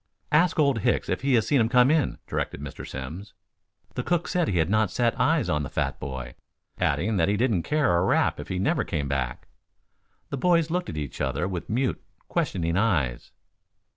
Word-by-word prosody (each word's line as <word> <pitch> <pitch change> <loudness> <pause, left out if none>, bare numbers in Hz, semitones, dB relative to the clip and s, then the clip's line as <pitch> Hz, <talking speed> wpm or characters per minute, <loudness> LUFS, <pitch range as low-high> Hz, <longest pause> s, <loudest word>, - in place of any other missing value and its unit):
"Ask 160 +3 +3
Old 140 -6 +3
Hicks - - 0
if - - -1
he 135 -1 +2
has 115 - +3
seen 140 -4 +3
him 110 - +2
come 125 +2 +5
in," 155 -3 +1
directed - - -3
Mr. 70 -1 -8
Simms. 80 +10 -7 0.6
The - - -2
cook 175 -1 0
said 175 -3 +1
he 90 - 0
had 80 -1 +2
not 110 +1 +2
set 120 +4 +1
eyes 160 0 +2
on 75 - +1
the 70 - -4
fat - - -2
boy, 65 -2 -6 0.5
adding 105 +4 +1
that 85 +1 +2
he 105 - +1
didn't 115 -6 +2
care 145 - +1
a 85 - +2
rap - - +2
if - - -7
he 95 - -3
never 95 - +1
came 70 -2 -2
back. 65 -3 -3 0.8
The 140 - -2
boys 170 +2 +2
looked 180 +1 -1
at 80 - -6
each 75 -3 -5
other 70 +6 -1
with 90 -3 -5
mute, 125 +4 0 0.3
questioning 90 - -1
eyes. 75 - 0
100 Hz, 200 wpm, -26 LUFS, -, 0.8 s, come